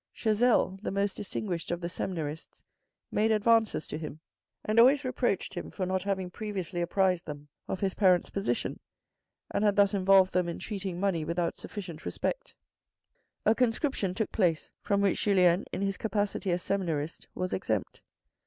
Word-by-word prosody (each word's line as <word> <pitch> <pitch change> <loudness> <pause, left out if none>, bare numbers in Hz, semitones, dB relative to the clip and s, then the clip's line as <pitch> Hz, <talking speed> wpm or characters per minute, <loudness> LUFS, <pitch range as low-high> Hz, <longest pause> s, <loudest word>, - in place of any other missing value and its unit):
Chazel, 215 -3 +2
the - - -3
most 200 0 0
distinguished 185 -4 -4
of 175 - -1
the 170 - -3
seminarists, 165 -3 -5 0.5
made 215 +1 +2
advances 220 -4 +3
to 155 - -5
him, 155 -1 -7 0.5
and 215 +2 +3
always 270 +4 +6
reproached 245 -5 -1
him 175 - -5
for 190 - -3
not 185 0 0
having 190 -2 -2
previously 190 -4 -4
apprised 180 0 +1
them 145 0 -7 0.2
of 185 - -3
his 195 -2 +1
parents' 185 -3 +3
position 195 -12 -2 0.7
and - - 0
had 205 -1 +3
thus 200 -1 +4
involved 190 -1 +5
them 180 -1 +1
in 170 - -4
treating 190 -4 -4
money 190 -5 +1
without 170 +1 -1
sufficient 175 -6 -7
respect. - - -3 0.9
A 220 - +6
conscription 225 - 0
took 220 +1 -1
place, 170 -6 +1
from 200 -1 +1
which 200 -2 +2
Julien, 180 -3 +4
in 195 - -2
his 195 -1 -1
capacity 205 -2 -1
as 175 0 0
seminarist, 165 -6 -2
was 185 0 -2
exempt. 110 - -2
190 Hz, 160 wpm, -29 LUFS, 175-210 Hz, 0.9 s, always